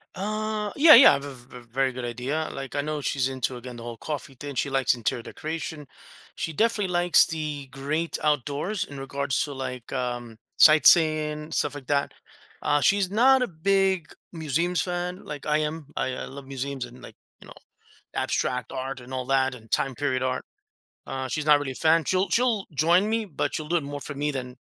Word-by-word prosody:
Uh, 215 Hz, +1 st, -2 dB
yeah, 305 Hz, +2 st, +9 dB
yeah, 255 Hz, -, +10 dB
I -, -, +4 dB
have 140 Hz, 0 st, -2 dB
a 140 Hz, -, -7 dB
v 125 Hz, 0 st, -13 dB
v 120 Hz, -, -18 dB
very 135 Hz, +1 st, +1 dB
good 125 Hz, -1 st, -5 dB
idea. 130 Hz, +7 st, -2 dB
Like, 135 Hz, 0 st, -7 dB
I 145 Hz, -, +1 dB
know 150 Hz, 0 st, -3 dB
she's 135 Hz, -2 st, 0 dB
into, 130 Hz, -1 st, -2 dB
again, 125 Hz, 0 st, -9 dB
the 115 Hz, -, -9 dB
whole 120 Hz, -1 st, -7 dB
coffee 140 Hz, -2 st, -6 dB
thing, 145 Hz, -1 st, -6 dB
she 135 Hz, +3 st, 0 dB
likes 135 Hz, -1 st, +2 dB
interior 120 Hz, 0 st, -2 dB
decoration, 155 Hz, +1 st, -6 dB, 0.5 s
she 165 Hz, -, -4 dB
definitely 210 Hz, 0 st, +1 dB
likes 175 Hz, -1 st, +5 dB
the 150 Hz, -3 st, -4 dB
great 150 Hz, +4 st, -2 dB
outdoors 150 Hz, -, 0 dB
in 140 Hz, -1 st, -9 dB
regards 140 Hz, 0 st, -1 dB
to, 145 Hz, -, -5 dB
like, 130 Hz, -2 st, -6 dB
um, 120 Hz, -3 st, -3 dB, 0.2 s
sightseeing, 155 Hz, -1 st, +5 dB
stuff 150 Hz, -2 st, 0 dB
like 135 Hz, -3 st, -9 dB
that. 140 Hz, -1 st, 0 dB, 0.5 s
Uh, 145 Hz, 0 st, +2 dB
she's 195 Hz, +1 st, +2 dB
not 255 Hz, +5 st, +5 dB
a -, -, -1 dB
big 190 Hz, -1 st, +1 dB, 0.3 s
museums 165 Hz, +1 st, 0 dB
fan 180 Hz, +1 st, -3 dB
like 150 Hz, -2 st, -7 dB
I 150 Hz, 0 st, +2 dB
am. 155 Hz, -1 st, -3 dB
I -, -, -1 dB
I -, -, -5 dB
love 140 Hz, 0 st, -10 dB
museums 135 Hz, -1 st, -4 dB
and, 125 Hz, +1 st, -14 dB
like, -, -, -11 dB, 0.2 s
you -, -, -15 dB
know, -, -, -11 dB, 0.6 s
abstract 125 Hz, 0 st, -1 dB
art 135 Hz, 0 st, -4 dB
and 125 Hz, +1 st, -11 dB
all 130 Hz, -1 st, -3 dB
that 135 Hz, -1 st, +2 dB
and 115 Hz, -2 st, -14 dB
time 135 Hz, -1 st, 0 dB
period 130 Hz, -1 st, -1 dB
art. 130 Hz, 0 st, -1 dB, 0.6 s
Uh, 130 Hz, 0 st, -4 dB
she's 150 Hz, +3 st, -3 dB
not 150 Hz, -1 st, +7 dB
really 145 Hz, -2 st, -4 dB
a -, -, -11 dB
fan. 160 Hz, +3 st, +3 dB
She'll 185 Hz, +5 st, +1 dB
she'll 230 Hz, 0 st, +1 dB
join 170 Hz, +7 st, +4 dB
me, 225 Hz, 0 st, 0 dB
but 180 Hz, -8 st, -3 dB
she'll 155 Hz, -1 st, -4 dB
do 175 Hz, -, +2 dB
it 165 Hz, -, 0 dB
more 145 Hz, 0 st, -6 dB
for 145 Hz, -, -7 dB
me 145 Hz, +2 st, -1 dB
than 125 Hz, -3 st, -5 dB
145 Hz, 205 wpm, -26 LUFS, 130-165 Hz, 0.6 s, yeah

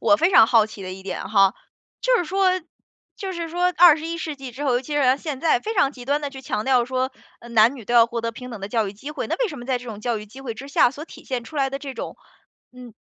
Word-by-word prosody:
我 305 Hz, -, +4 dB
非 340 Hz, +4 st, +2 dB
常 220 Hz, -, +8 dB
好 225 Hz, -2 st, +4 dB
奇 210 Hz, -2 st, -10 dB
的 185 Hz, 0 st, -6 dB
一 190 Hz, 0 st, -10 dB
点 190 Hz, 0 st, -5 dB
哈， 195 Hz, -2 st, +4 dB, 0.5 s
就 -, -, +3 dB
是 355 Hz, -, 0 dB
说 380 Hz, +2 st, +2 dB, 0.7 s
就 385 Hz, -1 st, -5 dB
是 340 Hz, -2 st, -4 dB
说 360 Hz, +2 st, +1 dB
21 330 Hz, -1 st, +5 dB
世 310 Hz, -2 st, -4 dB
纪 270 Hz, -2 st, -8 dB
之 275 Hz, +5 st, -6 dB
后， 265 Hz, -, +2 dB
尤 245 Hz, -, +2 dB
其 290 Hz, +3 st, -6 dB
是 265 Hz, -2 st, +4 dB
现 285 Hz, -4 st, -5 dB
在， 315 Hz, -7 st, +3 dB
非 445 Hz, +1 st, -4 dB
常 325 Hz, -7 st, +3 dB
极 245 Hz, -2 st, -11 dB
端 285 Hz, +3 st, 0 dB
地 285 Hz, -, -3 dB
去 265 Hz, -1 st, -9 dB
强 215 Hz, -5 st, -3 dB
调 255 Hz, -3 st, +3 dB
说， 260 Hz, +1 st, -2 dB, 0.3 s
呃， 235 Hz, -, -12 dB
男 230 Hz, +4 st, +4 dB
女 230 Hz, -, -10 dB
都 240 Hz, -, -4 dB
要 230 Hz, -1 st, +7 dB
获 235 Hz, 0 st, -4 dB
得 230 Hz, 0 st, -3 dB
平 250 Hz, +2 st, -9 dB
等 225 Hz, -4 st, -8 dB
的 195 Hz, -, -5 dB
教 220 Hz, -3 st, 0 dB
育 -, -, -7 dB
机 270 Hz, +9 st, -9 dB
会， 300 Hz, -, -4 dB
那 -, -, -1 dB
为 -, -, 0 dB
什 295 Hz, -6 st, -8 dB
么 240 Hz, -, -9 dB
在 255 Hz, -2 st, 0 dB
这 250 Hz, -, -12 dB
种 215 Hz, -3 st, -7 dB
教 235 Hz, 0 st, -1 dB
育 210 Hz, -, -8 dB
机 260 Hz, +6 st, -13 dB
会 235 Hz, -4 st, -5 dB
之 275 Hz, +4 st, -9 dB
下， 250 Hz, -, +4 dB
所 295 Hz, +3 st, -8 dB
体 -, -, -14 dB
现 250 Hz, -3 st, -3 dB
出 305 Hz, -, -10 dB
来 270 Hz, -1 st, +2 dB
的 275 Hz, +1 st, -4 dB
这 280 Hz, -2 st, -7 dB
种， -, -, -7 dB, 0.6 s
嗯， 250 Hz, -3 st, -12 dB
260 Hz, 315 characters per minute, -23 LUFS, 230-300 Hz, 0.7 s, 常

